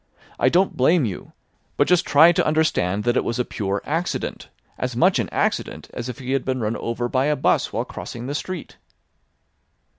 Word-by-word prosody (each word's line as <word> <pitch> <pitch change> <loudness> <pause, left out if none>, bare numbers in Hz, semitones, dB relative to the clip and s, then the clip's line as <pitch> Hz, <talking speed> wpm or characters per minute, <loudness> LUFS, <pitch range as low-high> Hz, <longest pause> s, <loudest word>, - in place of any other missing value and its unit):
I - - +4
don't 185 +3 +2
blame 150 +3 +3
you. 100 -5 -6 0.5
But - - +3
just 180 0 +3
try 160 +4 +7
to 175 - +1
understand 130 - +1
that 120 0 +1
it - - +2
was 115 - -2
a 125 - 0
pure 100 -2 -3
accident; 165 +4 -3 0.3
as - - -3
much - - +3
an - - -1
accident - - -2
as 120 +1 -5
if 120 - -6
he 130 -1 -5
had 135 -1 +1
been 130 -1 -2
run 110 0 -1
over 120 +1 -2
by 130 +2 +1
a 150 0 +2
'bus 135 - +1
while - - -2
crossing 120 0 -7
the 140 - -3
street." 175 +3 -5
130 Hz, 200 wpm, -22 LUFS, 120-160 Hz, 0.5 s, try